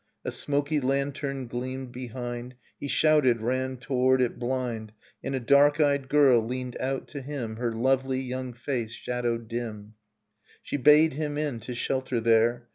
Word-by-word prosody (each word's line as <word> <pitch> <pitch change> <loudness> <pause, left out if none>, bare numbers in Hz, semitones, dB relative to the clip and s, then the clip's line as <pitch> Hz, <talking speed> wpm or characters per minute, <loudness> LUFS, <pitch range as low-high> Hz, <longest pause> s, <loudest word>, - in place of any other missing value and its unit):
A - - -1
smoky 145 +1 0
lantern 140 0 -1
gleamed 130 +2 -5
behind, 120 0 -6 0.2
He - - -4
shouted, 145 -5 +3
ran 130 +3 -1
toward 130 0 +2
it 125 -2 0
blind. 120 -4 -3 0.3
And 135 - -2
a - - 0
dark 140 +4 +4
eyed 140 -3 +2
girl 135 -5 +5
leaned 125 +1 -4
out 135 +1 -2
to 145 - -6
him 125 -5 -5
Her 120 0 -1
lovely 130 +3 +1
young 130 -1 -4
face 120 -2 -3
shadowed 120 -2 -3
dim. 110 -3 -5 0.7
She - - -3
bade 150 +3 +6
him 145 0 -3
in 145 -6 -2
to 125 +2 -7
shelter 130 0 -1
there. 115 +1 +2
130 Hz, 155 wpm, -27 LUFS, 120-140 Hz, 0.7 s, bade